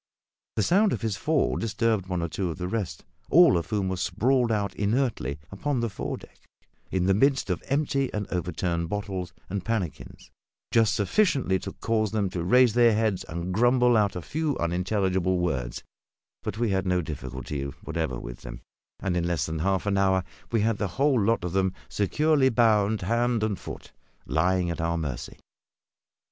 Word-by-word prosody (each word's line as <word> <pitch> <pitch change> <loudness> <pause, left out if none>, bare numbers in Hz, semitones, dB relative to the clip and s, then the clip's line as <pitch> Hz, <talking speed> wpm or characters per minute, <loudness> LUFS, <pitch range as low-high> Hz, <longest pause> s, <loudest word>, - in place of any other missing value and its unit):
The 110 - +2
sound 195 - +3
of - - -3
his 110 -3 0
fall 155 +5 +1
disturbed 110 -3 0
one 90 -2 -2
or - - 0
two 90 +2 -2
of 80 - -5
the 90 -1 -3
rest 95 -7 -3 0.2
all 170 - +7
of 85 - -1
whom 100 -3 0
were 95 0 -2
sprawled 120 +5 +1
out 100 -3 0
inertly 105 - 0
upon 130 +7 -1
the 115 -2 -1
foredeck, - - -6 0.5
in 90 -1 0
the 95 - +4
midst 135 0 +2
of 90 - -2
empty 140 -1 0
and 105 -1 -3
overturned 85 -1 -2
bottles 95 -3 -3 0.2
and 100 0 -3
pannikins 100 - -4 0.4
just 110 -2 +3
sufficiently 130 - +2
to - - -7
cause 110 -2 -1
them 100 -4 0
to 85 -2 -3
raise 125 +5 +5
their 120 -2 +5
heads 110 -4 0
and 85 +3 -4
grumble 120 +3 +4
out 105 -2 +2
a 90 - -5
few 155 -2 -1
unintelligible 95 +1 0
words; 65 -9 -2 0.6
but 105 - -4
we 115 -2 +1
had 95 0 0
no 90 -1 +1
difficulty 65 -1 -5 0.2
whatever 80 -7 -2
with - - -8
them, - - -8 0.4
and 95 -2 -1
in 85 -1 0
less 85 -4 0
than 80 0 -4
half 95 +3 0
an 100 -1 +1
hour 95 -1 +3 0.3
we 115 -2 +2
had 110 0 +1
the 105 - 0
whole 130 -7 +3
of 90 -7 0
them 95 -1 +1
securely 145 +6 +2
bound, 110 -3 +3
hand 115 +2 +1
and 105 -4 -1
foot, - - -9 0.3
and - - -7
lying 90 +2 +2
at 85 - -4
our 85 +1 0
mercy. 75 -7 -5
100 Hz, 180 wpm, -26 LUFS, 90-115 Hz, 0.6 s, all